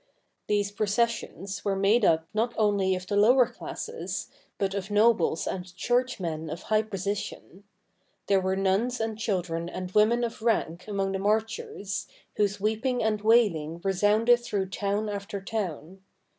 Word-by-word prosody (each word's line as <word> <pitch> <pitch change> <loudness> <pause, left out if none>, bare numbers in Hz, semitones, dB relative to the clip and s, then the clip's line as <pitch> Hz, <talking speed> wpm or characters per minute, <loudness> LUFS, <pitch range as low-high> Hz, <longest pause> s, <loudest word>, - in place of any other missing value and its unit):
These 205 -1 +1
processions 205 -2 -1
were 200 -1 0
made 200 +4 +3
up 160 -3 +3
not 230 +2 0
only 200 -3 +2
of 185 0 -6
the 200 - -2
lower 240 +5 +6
classes, 455 - -6 0.3
but 195 -1 -1
of 195 0 -4
nobles 210 -6 +3
and 180 -1 -5
churchmen 185 -11 -1
of 165 +3 -6
high 215 0 +2
position; 200 -1 -5 0.6
there 195 -1 +3
were 190 0 0
nuns 195 +6 +1
and 225 -1 -2
children 180 -6 -2
and 180 0 -6
women 220 +4 +4
of 230 -1 -4
rank 185 -6 0
among 195 -2 -1
the 190 - -2
marchers, 210 -1 -2 0.3
whose 205 -1 +1
weeping 220 +4 0
and 215 -1 0
wailing 195 -8 +3
resounded 210 +5 +4
through 200 -5 -2
town 205 +2 -1
after 200 -1 -4
town. 190 -3 -5
205 Hz, 145 wpm, -27 LUFS, 190-220 Hz, 0.6 s, lower